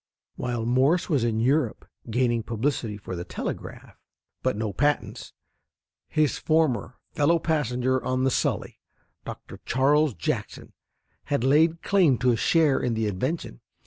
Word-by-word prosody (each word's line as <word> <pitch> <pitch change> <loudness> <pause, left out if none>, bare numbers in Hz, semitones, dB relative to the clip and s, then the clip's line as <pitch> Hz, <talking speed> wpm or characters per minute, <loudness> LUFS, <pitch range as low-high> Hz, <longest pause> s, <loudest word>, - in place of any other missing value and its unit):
While 120 -2 -3
Morse 135 +10 +2
was 140 -8 +2
in 115 -2 0
Europe 140 +7 0 0.2
gaining 120 0 +1
publicity 115 -1 -2
for 95 -2 -7
the 85 - -4
telegraph, - - -7 0.4
but - - 0
no 110 -2 -2
patents, 145 +8 -1 0.8
his 155 -2 +1
former 155 -6 +1 0.2
fellow 165 +2 +3
passenger 130 -5 0
on 130 0 0
the 135 - +2
Sully, - - -1 0.5
Dr. - - -9
Charles 140 +1 +2
Jackson, 80 - -4 0.5
had 140 -5 -1
laid 160 +5 +3
claim 180 -10 +3
to 125 +1 +2
a - - +2
share 155 +4 +3
in 120 -2 -1
the 110 0 0
invention. 105 - -3
130 Hz, 140 wpm, -25 LUFS, 115-150 Hz, 0.8 s, fellow